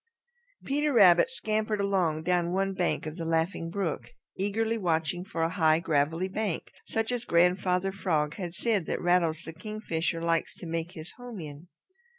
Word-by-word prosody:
Peter 295 +2 +1
Rabbit 195 -4 +6
scampered 215 -4 -1
along 180 -6 +1
down 175 0 +1
one 195 +1 0
bank 180 -4 -1
of 155 0 -6
the 165 - -4
Laughing 165 +1 0
Brook, 165 -10 -3 0.3
eagerly 220 +4 0
watching 170 -4 0
for 165 -3 -3
a 165 - +2
high, 160 -3 +3
gravelly 165 +2 +1
bank 200 -2 -3 0.2
such 225 +1 -1
as 245 -1 -2
Grandfather 180 +1 +2
Frog 160 -6 0
had 175 -3 -6
said 210 -3 0
that - - -1
Rattles 170 -2 +2
the 160 - -7
Kingfisher 170 -3 -3
likes 165 0 0
to - - -8
make 165 +1 -3
his 160 -1 -7
home 245 -4 -8
in. 150 +1 -9
180 Hz, 165 wpm, -28 LUFS, 165-200 Hz, 0.3 s, Rabbit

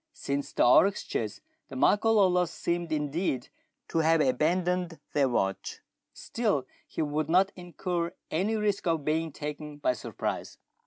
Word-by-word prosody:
Since 140 0 -3
the - - +3
oryx 190 +11 +5
chase - - -3 0.3
the - - -9
Makololos 200 -7 +4
seemed 170 0 -2
indeed 150 -3 -1 0.4
to 165 - 0
have 160 0 +4
abandoned 170 +5 +1
their 140 -3 +3
watch, 95 -5 -2 0.3
still 210 - -1 0.2
he - - -2
would 150 +1 -1
not 190 +3 +4
incur 175 -1 -3 0.2
any 195 +7 +1
risk 205 -3 0
of 165 -4 0
being 160 +1 0
taken 150 0 -6
by 145 -3 +1
surprise. 125 - -4
165 Hz, 140 wpm, -29 LUFS, 150-180 Hz, 0.4 s, oryx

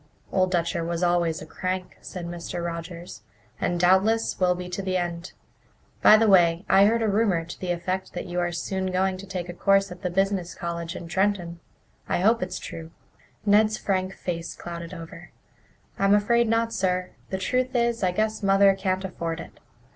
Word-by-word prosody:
"Old 185 -1 +2
Dutcher 170 -2 0
was 170 +1 -2
always 175 -2 +1
a - - -9
crank," 185 0 -4
said 180 -2 -7
Mr. 170 0 -5
Rogers, 170 - -6 0.4
"and 175 - 0
doubtless 190 +6 +3
will 180 -1 +3
be 180 0 -6
to 180 +2 -4
the 185 -1 -1
end. 175 0 -4 0.7
By 215 - +8
the 225 0 +3
way, 175 -2 +4
I 195 +1 +6
heard 230 +1 +2
a - - +2
rumour 200 -5 +1
to 170 - -9
the 185 - -4
effect 185 +2 -2
that 175 - -5
you 180 0 -3
are 175 0 0
soon 190 +2 -2
going 185 +1 +1
to 195 +1 -10
take 180 -2 -4
a 175 - -6
course 195 +1 +2
at 180 0 -9
the 180 - -1
business 190 -1 0
college 170 -1 -4
in 170 - -7
Trenton. 180 -2 0 0.5
I - - +1
hope 225 +4 +3
it's 185 0 -3
true." 160 -1 -8 0.6
Ned's 215 +1 +4
frank 190 -1 -1
face 170 -2 -4
clouded 170 -1 -7
over. 165 0 -10 0.7
"I'm 195 +1 +5
afraid 235 +3 +3
not, 230 0 +1
sir. 185 -3 0 0.2
The 190 - -2
truth 255 +7 -1
is, 235 -1 +1
I 185 - +3
guess 215 +3 -1
Mother 195 0 +5
can't 190 0 -1
afford 170 -2 -4
it. - - -10
185 Hz, 190 wpm, -25 LUFS, 175-195 Hz, 0.7 s, By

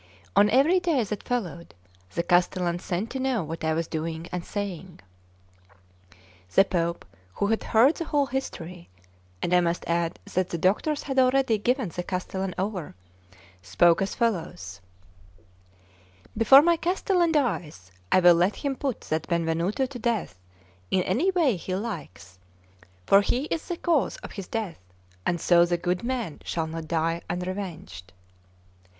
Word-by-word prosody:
On 205 - +6
every 280 - +4
day 330 -9 +1
that 210 -1 -6
followed, 180 -9 -3 0.4
the 170 - 0
castellan 175 0 +1
sent 190 +5 -3
to 265 - -4
know 260 -6 0
what 160 +1 -6
I 160 0 +1
was 165 +1 -1
doing 160 +1 -4
and 180 -1 -3
saying. 190 -4 -6 1.6
The 195 - +7
Pope, 170 -3 -2 0.3
who - - 0
had 220 +2 0
heard 250 +8 +4
the 335 - -3
whole 290 -2 +1
history 180 -10 -6 0.5
(and 175 - 0
I 180 - +6
must 170 0 -1
add 170 0 -1 0.2
that 185 0 0
the 170 - -3
doctors 215 - +1
had 270 -2 0
already 255 -3 +3
given 250 -1 0
the 180 - -4
castellan 185 0 -4
over), 190 -4 -3 0.7
spoke 170 - +3
as 195 - -2
follows: 160 - -2 1.5
"Before 235 +6 +7
my 340 0 +3
castellan 355 0 +1
dies 165 - -1 0.2
I 185 - +5
will 175 -1 +8
let 175 +4 +2
him 280 -2 -3
put 270 -5 -3
that 155 0 -3
Benvenuto 170 +8 0
to 255 -1 -8
death 215 - -2 0.5
in 185 - +2
any 250 - +1
way 325 - +2
he 185 +2 -4
likes, 95 - -7 0.7
for 195 - +6
he 245 +6 0
is 325 - -2
the 350 - -3
cause 330 -5 +1
of - - -8
his 195 -4 -7
death, 215 - -4 0.5
and 175 - 0
so 170 0 +5
the 175 0 +1
good 180 +1 -1
man 235 - -3
shall 165 -2 -2
not 160 0 -6
die 165 +1 0
unrevenged." 180 - -5
185 Hz, 155 wpm, -26 LUFS, 170-250 Hz, 1.6 s, will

